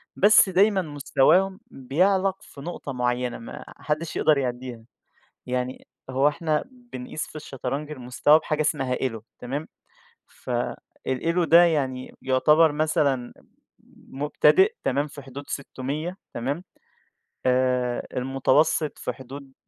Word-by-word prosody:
بس 205 0 +6
دايمًا 195 +2 +4
مستواهم 155 +5 +2
بيعلَق 185 +8 +1
في 140 - -13
نقطة 165 -2 -6
معيّنة 125 0 -1
ما 115 - -9
حدّش 155 +2 -3
يقدَر 155 -2 +3
يعدّيها، 125 -3 -4 0.6
يعني 125 0 -3 0.2
هو 135 +2 +3
إحنا 150 0 0
بنقيس 240 - -7
في - - -16
الشطرنج 140 0 -5
المستوى 130 +3 +3
بحاجة 155 -1 -2
اسمها 140 -4 0
ELO 115 -5 -3 0.2
تمام، 140 +5 -4 0.6
فالELO 130 +7 -2
ده 170 +2 +7
يعني 135 -6 -1
يعتبَر 150 +5 +4
مثلًا 145 -5 0 0.8
مبتدئ 370 - +3
تمام، 145 +1 +1
في 145 -1 -11
حدود 135 +2 -9
600 145 +6 -4 0.2
تمام، 140 +9 -3 0.8
آآ 125 -1 +1
المتوسط 135 +4 +1
في - - -4
حدود 135 +1 -11
140 Hz, 115 wpm, -25 LUFS, 130-160 Hz, 0.8 s, ده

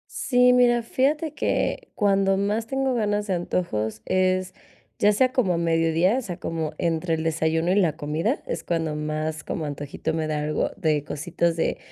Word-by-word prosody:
Sí, 250 -1 +4
mira, 240 -1 +4
fíjate 295 +6 0
que, - - -1
cuando 195 -3 +2
más 210 +3 0
tengo 270 +1 -1
ganas 210 -2 0
de 190 - 0
antojos 110 - -2
es, 185 0 +1 0.5
ya 210 - +5
sea 255 +4 +2
como 235 -9 +2
a - - 0
mediodía, 165 +5 +2
o - - -1
sea, 180 -7 -6
como 160 -2 -3
entre 165 0 0
el 160 - -3
desayuno 160 +2 +1
y - - +2
la 165 -6 +2
comida, 165 - -1
es - - -3
cuando 165 -3 -1
más 155 +1 -3
como 155 - -4
antojito 145 +2 -4
me 160 -1 -1
da 150 -1 -1
algo, 155 0 -1
de 155 -6 +1
cositas 165 +3 -1
de, - - 0
175 Hz, 180 wpm, -24 LUFS, 160-210 Hz, 0.5 s, ya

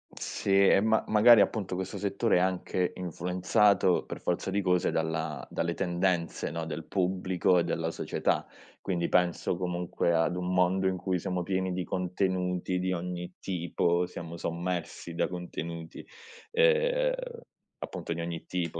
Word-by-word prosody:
Sì 100 0 +2
e - - +6
ma 110 +1 +2
magari 110 +1 +7
appunto 100 -3 0
questo 95 0 -4
settore 100 +1 +1
è - - +4
anche 90 0 0
influenzato, 90 +2 +2
per - - -7
forza 90 +2 -1
di 100 +1 0
cose, 90 -1 +2
dalla 80 -1 -2
dalle 85 +1 -1
tendenze, 85 -2 -1
no, 80 +1 -4
del 80 0 -5
pubblico 90 -1 +1
e - - +2
della 80 -1 -1
società. - - -1 0.3
Quindi 85 -3 -1
penso 90 -1 +1
comunque 90 -1 -1
ad 85 +2 +1
un 90 0 -2
mondo 95 +1 +2
in 95 - +1
cui 90 0 -1
siamo 90 +1 -2
pieni 95 0 -1
di 90 0 -2
contenuti 90 0 -1
di 95 0 0
ogni 90 0 -4
tipo, 85 -1 0
siamo 85 -1 -8
sommersi 85 0 -4
da 85 - 0
contenuti, 85 -2 -6 0.5
ehm, - - +3 0.7
appunto - - -5
di 85 - -4
ogni 85 -1 -5
tipo, 85 -2 -3
90 Hz, 150 wpm, -29 LUFS, 85-95 Hz, 0.7 s, magari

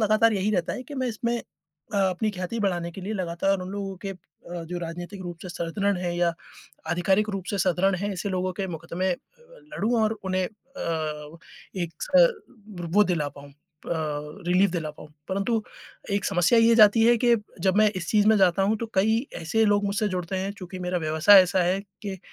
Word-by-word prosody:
लगातार 215 +1 +4
यही 200 +1 0
रहता 175 -4 0
है - - -6
कि 290 - -9
मैं 260 -2 -1
इसमें 235 +1 -1 0.6
अ, 200 - +2
अपनी 195 +3 +1
ख्याति 185 +3 -4
बढ़ाने 175 -4 -1
के 195 - -8
लिए 205 +4 -4
लगातार 185 +1 0
उन 180 - -6
लोगों 195 -1 -5
के - - -2
अ, - - -6 0.5
जो 175 +2 -5
राजनीतिक 175 +3 -6
रूप 175 -2 -7
से 185 - -7
सुदृढ़ 195 +4 -1
हैं 175 -1 -2
या 175 -1 +2 0.6
आधिकारिक 190 +4 +2
रूप 195 -2 -4
से 200 - -2
सुदृढ़ 190 +1 +2
हैं, 200 +3 -2
ऐसे 195 +2 -3
लोगों 185 0 -1
के 195 - -2
मुकदमे 170 +3 -3 0.7
लड़ूँ 225 +5 0
और 215 0 +2
उन्हें 185 0 0
अ, 165 - -5 0.4
एक 175 -3 -3
स - - +5 0.7
वो 210 0 +6
दिला 165 -6 0
पाऊँ 140 +1 -13
अ, 140 - -22 0.9
रिलीफ 180 +2 +3
दिला 165 -3 -3
पाऊँ। 150 0 -13 0.2
परंतु 205 +4 0 0.5
एक 200 -1 0
समस्या 190 +4 +3
ये 230 0 +5
जाती 215 0 +7
है 240 0 +6
कि 240 -1 +5 0.2
जब 190 +1 +2
मैं 215 0 +5
इस 180 -1 -4
चीज़ 210 -1 +3
में 220 - +6
जाता 190 0 +4
हूँ 210 +3 +2
तो 230 - -3
कई 220 +6 +2 0.2
ऐसे 220 +8 +2
लोग 205 0 +3
मुझसे 205 +1 0
जुड़ते 185 0 -3
हैं 195 +2 -2
चूँकि 185 -1 -8
मेरा 180 0 -1
व्यवसाय 160 +5 +6
ऐसा 185 +1 0
है 185 +3 +1 0.2
कि 195 -3 -5
190 Hz, 200 wpm, -25 LUFS, 175-210 Hz, 0.9 s, जाती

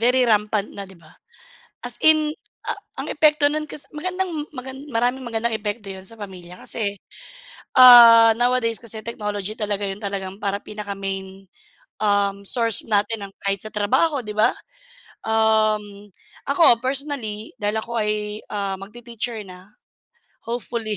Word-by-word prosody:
very 250 +2 +3
rampant 210 -2 +1
na, 200 -1 -8
'di 190 - -15
ba? 160 -2 -19 0.7
As - - -4
in, 310 -1 +4 0.3
a - - -4 0.2
ang - - -5
epekto 300 -1 +3
nun 305 +1 -3
kas 295 0 -6
magandang 355 -1 -3
magan 265 +2 -8
maraming 245 0 -1
magandang 230 0 -1
epekto 210 -1 -4
'yon 190 0 -9
sa 230 - -8
pamilya 185 -4 -10
kasi, 205 -3 -3 0.9
ah, 230 -2 +10
nowadays 245 -1 +1
kasi 225 -2 -6
technology 210 -2 -4
talaga 205 -2 -2
'yon 195 - -4
talagang 195 -2 -5
parang 200 0 -3
pinaka 210 -1 -7
main, 195 -1 -6 0.5
um, 200 -1 +1
source 230 +2 +2
natin 205 -1 0
ng 195 - -25
kahit 195 -1 0
sa 215 - -6
trabaho, 255 +7 +1
'di 210 - -5
ba? 215 +3 +4 0.7
Um, 215 -2 +1 0.4
ako 280 -5 +5
personally, 255 -5 -3
dahil 210 +1 -1
ako 235 -1 -3
ay, 210 0 -2
ah, 195 -2 -3
magti-teacher 230 +1 -5
na, 185 0 -13 0.7
hopefully. 230 -2 -4
215 Hz, 145 wpm, -22 LUFS, 200-245 Hz, 0.9 s, ah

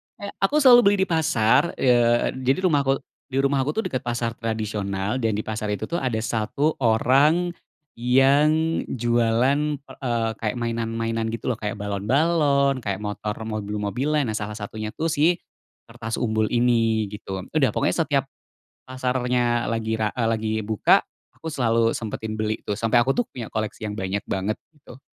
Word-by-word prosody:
kayak 200 0 -8
aku 195 +10 +1
selalu 245 -3 +8
beli 200 0 +4
di - - -3
pasar, 150 -2 +2
eee, 120 -2 +3
jadi 135 +9 +1
rumahku, 140 -3 +2 0.3
di 135 -1 -4
rumahku 140 +1 +1
tuh 220 - -1
deket 130 0 -4
pasar 120 -1 -2
tradisional 105 -1 -2
dan 115 -4 0
di 105 - -1
pasar 110 -1 -4
itu 100 - -5
tuh 170 - -1
ada 125 -4 -1
1 115 +7 -1
orang 140 +9 +3 0.5
yang 145 +6 +3
jualan 120 +3 +1 0.2
per 130 -1 -14
eee, 115 -3 0
kayak 110 +1 -2
mainan-mainan 115 -1 -2
gitu 115 - -3
loh, 115 - -3
kayak 105 -1 -3
balon-balon, 140 - +1
kayak 100 -3 -4
motor 105 0 -4
mobil-mobilan, 110 +6 -2
nah 110 - -2
salah 105 0 -5
satunya 110 +1 -6
tuh 165 +1 -2
sih 160 +4 +3 0.5
kertas 110 0 -5
umbul 110 -2 0
ini 115 -3 +2
gitu. 95 -3 -6
Udah - - +3
pokoknya - - +1
setiap - - +1 0.6
pasarnya 125 -3 0
lagi 110 -1 -1
ra 105 -1 +1
eee, 115 -2 +1
lagi 110 -1 -1
buka, 110 -1 +3 0.3
aku 160 - -12
selalu 115 -3 +2
sempetin 110 -1 -4
beli 110 0 -1
tuh 105 - -1
sampe 115 +2 +1
aku 130 +3 +3
tuh 245 - +1
punya 120 -3 -6
koleksi 110 0 -3
yang 105 - -4
banyak 100 0 -3
banget, 100 +3 -2 0.2
gitu. 135 -3 -15
115 Hz, 160 wpm, -23 LUFS, 110-135 Hz, 0.6 s, selalu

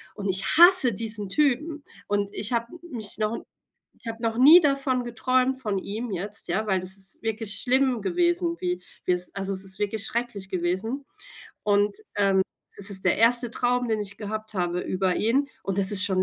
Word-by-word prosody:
und 200 -1 -4
ich 190 +1 0
hasse 345 - +7
diesen 215 -1 -1
Typen. 300 - 0 0.2
Und 205 0 -1
ich 210 - -3
habe 235 0 -1
m 345 - -12 0.2
mich 210 -2 -1
noch 215 +1 -1 0.6
ich - - -14
habe 225 0 -6
noch 230 -1 -2
nie 305 +8 +8
davon 275 -4 0
geträumt 255 +2 0
von 210 -5 -2
ihm 220 +5 -6
jetzt, 200 +3 -6
ja, 215 +5 -1
weil 190 -2 +1
das 185 +1 -2
ist 190 -2 -1
wirklich 220 -1 -1
schlimm 260 -1 +1
gewesen, 345 -1 0
wie 180 0 -3 0.2
wie - - +1
es 180 0 0
also 195 0 0
es 190 - +5
ist 190 -1 +2
wirklich 210 +1 -1
schrecklich 235 -5 -4
gewesen. 190 +9 -2 0.6
Und, 205 - +1 0.2
ähm, 195 -2 +3 0.4
das 200 +1 0
ist 190 -1 0
der 185 - +3
1. 240 +2 +3
Traum, 245 +1 -1
den 220 -1 -1
ich 200 -1 -8
gehabt 215 +1 -6
habe 175 -1 -1
über 185 -1 -1
ihn, 270 +6 +1
und 195 0 -3
das 195 -1 +4
ist 190 -1 +5
schon 190 -2 +1
215 Hz, 195 wpm, -25 LUFS, 195-250 Hz, 0.6 s, nie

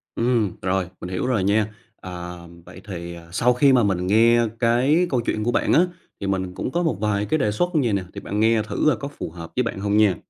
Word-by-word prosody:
Ừm, 115 -4 +1
rồi, 95 -1 -1
mình 90 - -6
hiểu 90 0 -2
rồi 120 -7 +1
nha. 105 +2 +1 0.3
À, 90 -1 -7 0.3
vậy 90 - -12
thì, 85 -3 -6
ờ, 85 -1 -13
sau 125 +7 +3
khi 135 +2 +4
mà 125 -2 +4
mình 90 -3 0
nghe 115 +3 +4
cái 130 +9 +3
câu 130 -5 +1
chuyện 110 -2 -2
của 120 - +1
bạn - - +1
á, 165 - +6 0.4
thì 100 - -4
mình 95 -1 -2
cũng 110 - -4
có 175 +4 0
một 145 - 0
vài 105 -1 0
cái 155 - +1
đề 105 -8 +1
xuất 175 +12 0
vầy 130 -9 +2
nè, 100 -2 0
thì - - -7
bạn 105 - -3
nghe 110 0 +3
thử 105 -1 -3
coi 155 - +4
có 140 - -5
phù 145 - -7
hợp 85 -2 -9
với 125 - +2
bạn 115 -3 -4
hông 100 +1 0
nha. 105 -4 +4
105 Hz, 255 wpm, -23 LUFS, 95-120 Hz, 0.4 s, á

